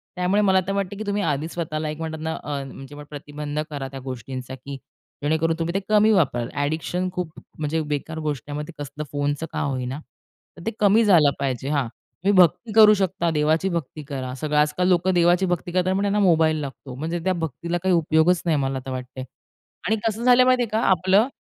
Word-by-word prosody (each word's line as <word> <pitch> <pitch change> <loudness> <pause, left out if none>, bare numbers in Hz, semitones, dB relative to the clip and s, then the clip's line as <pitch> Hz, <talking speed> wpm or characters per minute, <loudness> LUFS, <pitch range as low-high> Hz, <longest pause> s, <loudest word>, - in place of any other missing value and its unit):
त्यामुळे 180 +3 +2
मला 190 -2 +4
तर - - 0
वाटतं 200 0 -2
की 215 - -4
तुम्ही 205 0 0
आधीच 155 +1 -1
स्वतःला 155 -2 -3
एक 155 - -5
म्हणतात 160 -1 -4
ना, 160 0 -2
अ, 140 -2 -3
म्हणजे 135 +2 -10
प्रतिबंध 145 0 -6
करा 140 -3 -4
त्या 135 0 -8
गोष्टींचा, 130 +1 -6
की 140 +1 -8 0.5
जेणेकरून 160 +2 +1
तुम्ही 170 +1 -1
ते - - +3
कमी 215 +1 +5
वापराल. 130 - +2
अ‍ॅडिक्शन 160 +5 -1
खूप 180 -3 -3 0.3
म्हणजे 155 +1 -1
बेकार 150 +2 -4
गोष्ट 150 -4 -3
आहे. 145 - -4
मग 150 - -5
ते - - -8
कसलं 145 +1 -6
फोनचं 145 +2 -1
का - - -3
होईना, 130 0 -2 0.6
तर - - -10
ते 225 - 0
कमी 210 +2 +5
झालं 165 -8 +6
पाहिजे 135 -1 -2
हां, 140 -5 0
तुम्ही 185 - -4
भक्ती 185 +6 +4
करू 215 -1 +8
शकता. 185 -3 0
देवाची 160 +5 +1
भक्ती 160 -3 -4
करा. 130 -3 -5
सगळं 150 +1 -2
आजकाल 150 +5 +2
लोकं 185 +1 +3
देवाची 175 +2 +4
भक्ती 175 -1 -2
करतात, 185 +1 +1
पण 200 - 0
त्यांना 205 +1 +1
मोबाईल 160 -4 +4
लागतो. 135 -1 -7
म्हणजे 165 +5 -3
त्या 185 0 +2
भक्तीला 170 +1 -3
काही 190 -1 +3
उपयोगच 165 +2 +3
नाही 160 -3 +2
मला 135 -1 -1
तर 130 - -5
वाटतंय 130 0 -6 0.6
आणि 220 - +3
कसं 225 +2 -2
झालं 250 0 +6
माहिती 255 -1 +4
आहे 225 - -4
का 220 - 0
आपलं, 190 +5 +4
160 Hz, 205 wpm, -23 LUFS, 145-185 Hz, 0.6 s, करू